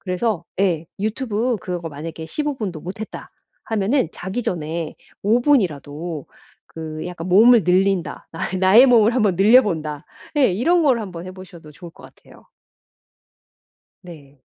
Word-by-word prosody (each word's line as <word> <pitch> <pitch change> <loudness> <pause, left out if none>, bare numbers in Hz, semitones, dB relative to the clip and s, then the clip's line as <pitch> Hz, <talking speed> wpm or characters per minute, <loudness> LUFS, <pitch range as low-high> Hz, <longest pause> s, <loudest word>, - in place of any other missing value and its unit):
그래서 185 -1 -2 0.2
예 170 -5 +1
유튜브 225 +2 -1
그거 175 -2 -5
만약에 160 +2 -7
15 295 - -3
분도 190 -8 -4
못 185 +5 -8
했다 220 - -8 0.3
하면은 225 - 0
자기 190 +7 -5
전에 165 -1 -3 0.3
5 225 +4 +3
분이라도 160 - -1 0.4
그 155 -1 -7
약간 175 -1 -6
'몸을 220 +3 +6
늘린다. 185 +1 0
아 165 - -4
이 185 - -1
나의 200 +8 +7
몸을 235 -2 +4
한번 210 -7 +2
늘려본다.' 190 - +3 0.3
예. 260 -9 +4
이런 330 - +2
거를 260 -6 +3
한번 180 -4 -8
해 185 - -7
보셔도 175 -5 -13
좋을 170 +3 -11
것 - - -17
같아요. - - -18 1.6
네. 145 -6 -14
185 Hz, 270 characters per minute, -21 LUFS, 165-225 Hz, 1.6 s, 나의